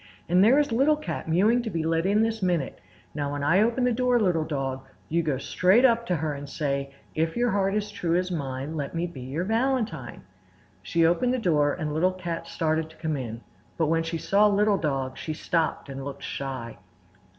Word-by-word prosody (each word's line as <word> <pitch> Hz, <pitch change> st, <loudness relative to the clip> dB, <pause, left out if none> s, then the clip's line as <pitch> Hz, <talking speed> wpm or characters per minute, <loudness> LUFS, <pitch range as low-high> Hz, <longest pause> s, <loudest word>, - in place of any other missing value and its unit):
"And 180 Hz, +3 st, +4 dB
there 240 Hz, +6 st, +6 dB
is 290 Hz, -3 st, +2 dB
Little 275 Hz, +6 st, +4 dB
Cat 300 Hz, -, -5 dB
mewing 205 Hz, +9 st, +3 dB
to 235 Hz, -, -4 dB
be 165 Hz, -5 st, -2 dB
let 165 Hz, +2 st, +1 dB
in 210 Hz, +2 st, +3 dB
this 225 Hz, -1 st, -1 dB
minute. 175 Hz, -7 st, -1 dB, 0.3 s
Now 145 Hz, -1 st, -2 dB
when 145 Hz, 0 st, -3 dB
I 170 Hz, +7 st, +4 dB
open 235 Hz, +3 st, +2 dB
the 250 Hz, -, +3 dB
door, 250 Hz, 0 st, +2 dB
Little 180 Hz, -7 st, +2 dB
Dog, 135 Hz, -3 st, -3 dB, 0.4 s
go 150 Hz, -4 st, 0 dB
straight 185 Hz, -, +3 dB
up 235 Hz, -2 st, +3 dB
to 180 Hz, -, +1 dB
her 155 Hz, -1 st, -2 dB
and 140 Hz, 0 st, -7 dB
say: 140 Hz, -2 st, -2 dB, 0.2 s
"'If 160 Hz, +4 st, -1 dB
your 240 Hz, -1 st, +2 dB
heart 195 Hz, 0 st, +1 dB
is 210 Hz, 0 st, -2 dB
true 175 Hz, -5 st, -1 dB
as 180 Hz, +1 st, 0 dB
mine, 140 Hz, -1 st, -4 dB
Let 145 Hz, +1 st, -4 dB
me 170 Hz, +1 st, 0 dB
be 170 Hz, -7 st, -8 dB
your 135 Hz, +7 st, -3 dB
valentine!'" 225 Hz, -, -1 dB, 0.6 s
She 165 Hz, -, +1 dB
opened 245 Hz, +10 st, +2 dB
the -, -, 0 dB
door 150 Hz, -, +2 dB
and 155 Hz, -3 st, -3 dB
Little 180 Hz, +4 st, +2 dB
Cat 175 Hz, -2 st, -5 dB
started 160 Hz, 0 st, -1 dB
to 160 Hz, -, -17 dB
come 160 Hz, -2 st, -2 dB
in, 115 Hz, -4 st, -5 dB, 0.4 s
but 160 Hz, -2 st, +1 dB
when 165 Hz, 0 st, +2 dB
she 165 Hz, 0 st, -3 dB
saw 200 Hz, +6 st, +3 dB
Little 205 Hz, -1 st, +3 dB
Dog 135 Hz, -4 st, -2 dB
she 155 Hz, -, -4 dB
stopped 165 Hz, -2 st, -1 dB
and 135 Hz, -1 st, -6 dB
looked 140 Hz, 0 st, -7 dB
shy. 130 Hz, -5 st, -5 dB
165 Hz, 210 wpm, -26 LUFS, 145-210 Hz, 0.6 s, there